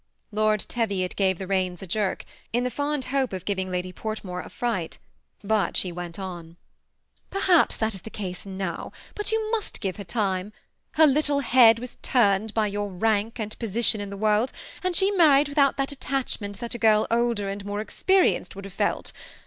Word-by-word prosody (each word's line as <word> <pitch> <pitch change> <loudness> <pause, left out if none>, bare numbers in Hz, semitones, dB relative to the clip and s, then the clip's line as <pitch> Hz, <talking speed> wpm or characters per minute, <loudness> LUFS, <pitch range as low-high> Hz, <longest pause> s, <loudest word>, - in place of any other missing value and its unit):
Lord 215 0 +2
Teviot 200 -6 -1
gave 190 -2 +2
the 190 - -5
reins 185 -1 -1
a - - -5
jerk, 195 +2 -1 0.3
in 240 +2 +1
the 250 - -1
fond 285 +2 -1
hope 265 -5 +1
of 185 -1 -5
giving 190 -2 -1
Lady 180 0 -3
Portmore 195 -5 -5
a - - -10
fright; 220 -9 -2 0.5
but 215 0 +1
she 180 - +1
went 175 -1 -6
on. 185 -4 -6 0.8
'^ - - -40
Perhaps 380 -4 +3
that 220 0 0
is 190 - -6
the - - -9
case 185 -5 -5
now, 190 -3 -5 0.2
but 415 0 -3
you 440 -1 0
must 445 -3 -2
give 195 -1 -3
}ier - - -4
time. 195 0 -1 0.4
Her 315 - +6
little 290 0 +3
head 235 -3 +6
was 245 +1 -8
turned 215 -3 +2
by 220 -1 +3
your 205 0 -2
rank 215 +4 0
and 215 -1 -5
position 225 -1 +1
in 200 - -5
the 200 - -7
world, 215 +4 +2 0.3
and 365 -1 0
she 390 +2 +3
married 300 -7 +5
without 285 -1 +3
that 275 0 0
attachment 255 -7 -3
that 235 0 -4
a 240 - -5
girl 215 -1 +4
older 230 -3 +1
and 195 0 -4
more 205 +1 -3
experienced 365 - +1
would 195 0 -8
have 195 - -9
felt. - - -1
215 Hz, 195 wpm, -25 LUFS, 195-250 Hz, 0.8 s, Her